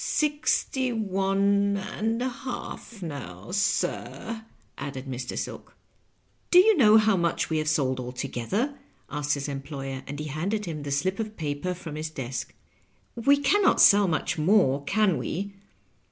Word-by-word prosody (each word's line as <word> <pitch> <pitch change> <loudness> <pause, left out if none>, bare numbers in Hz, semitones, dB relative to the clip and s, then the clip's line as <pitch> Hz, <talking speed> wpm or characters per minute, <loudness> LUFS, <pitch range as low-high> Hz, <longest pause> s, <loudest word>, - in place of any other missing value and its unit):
^^ - - -4
Sixty 290 -3 +1
one 200 -1 +1
and 225 +4 -2
a 260 - 0
half 240 -4 -7
now, 115 - -7
sir," 220 +3 -1 0.3
added 135 -1 -6
Mr. 125 -2 -5
Silk. - - -6 0.7
"Do 355 - +5
you 420 +4 +7
know 220 -8 +7
how 215 -1 +4
much 170 -2 0
we 160 - +2
have 155 0 0
sold 130 -4 +1
altogether? 135 - -3
" - - -37
asked 145 0 0
his 140 0 -4
employer; 135 -1 -5
and 145 +1 -5
he 150 - -4
handed 195 +9 -2
him 160 -4 -5
the 145 0 -5
slip 185 +8 0
of 215 -1 -4
paper 155 +3 -2
from 170 -3 -8
his 155 +1 -3
desk. 130 -4 -5 0.3
" - - -39
We 285 0 +7
can 285 +9 +3
not - - +4
sell 200 0 +7
much 160 -1 -1
more, 150 -6 +3
can 205 0 +2
we?" 200 +4 -4
180 Hz, 165 wpm, -26 LUFS, 140-215 Hz, 0.7 s, you